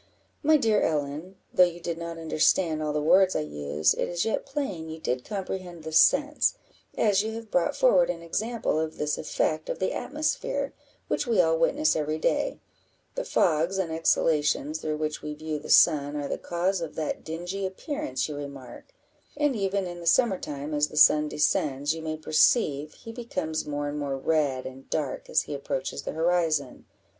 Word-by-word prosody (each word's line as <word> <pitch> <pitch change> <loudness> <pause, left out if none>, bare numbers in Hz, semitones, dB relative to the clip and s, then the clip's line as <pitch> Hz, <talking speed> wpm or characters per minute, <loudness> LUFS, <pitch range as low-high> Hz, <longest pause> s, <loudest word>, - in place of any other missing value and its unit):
"My 310 +1 +5
dear 225 -6 +2
Ellen, 150 +4 -2 0.2
though 180 - +7
you 175 -1 0
did 170 -1 -4
not 170 0 -5
understand 160 0 +1
all 155 -1 -1
the 150 - 0
words 185 +4 +5
I - - +1
used, 75 0 0
it - - 0
is 175 -1 -1
yet 225 - -1
plain 205 - -4
you 160 0 -7
did 125 -4 -2
comprehend 185 -4 -5
the 160 - -6
sense, 290 - +4 0.4
as 205 -3 +3
you 220 +1 -3
have 225 -1 -8
brought 180 - +1
forward 185 -9 +4
an 170 -1 -3
example 215 0 -1
of 160 0 -3
this 150 0 -1
effect 155 0 -1
of - - -2
the 190 - -1
atmosphere, 280 -1 -2 0.3
which 290 - -1
we 230 -5 +2
all 165 -2 +4
witness 285 - +2
every 155 0 -1
day; 290 - 0 0.6
the - - -3
fogs 170 +3 +1
and 185 -4 -1
exhalations 155 -2 +1
through 155 -1 -2
which 155 0 -3
we 150 0 -5
view 155 0 -4
the 145 - -11
sun 145 -3 +5
are 145 -1 -3
the - - -3
cause 175 +2 -1
of 165 - -5
that 155 -2 -3
dingy 175 +5 -5
appearance 290 - -3
you 150 - -6
remark: 140 - -9 0.4
and 295 -3 +1
even 195 -2 -1
in 175 -1 -6
the 170 - -7
summer 220 -1 +3
time, 145 +1 -5
as 150 0 +2
the 150 - -10
sun 150 0 +6
descends, 145 -1 +1
you 165 - -6
may 155 0 -4
perceive 155 - +2
he 225 - -10
becomes 225 -11 -4
more 145 0 -2
and 145 +1 -4
more 140 -2 -2
red 140 -2 0
and 130 +1 -10
dark 145 -4 -3
as - - +2
he - - -7
approaches 135 -1 -3
the - - -5
horizon. 160 -4 0
160 Hz, 190 wpm, -27 LUFS, 150-195 Hz, 0.6 s, though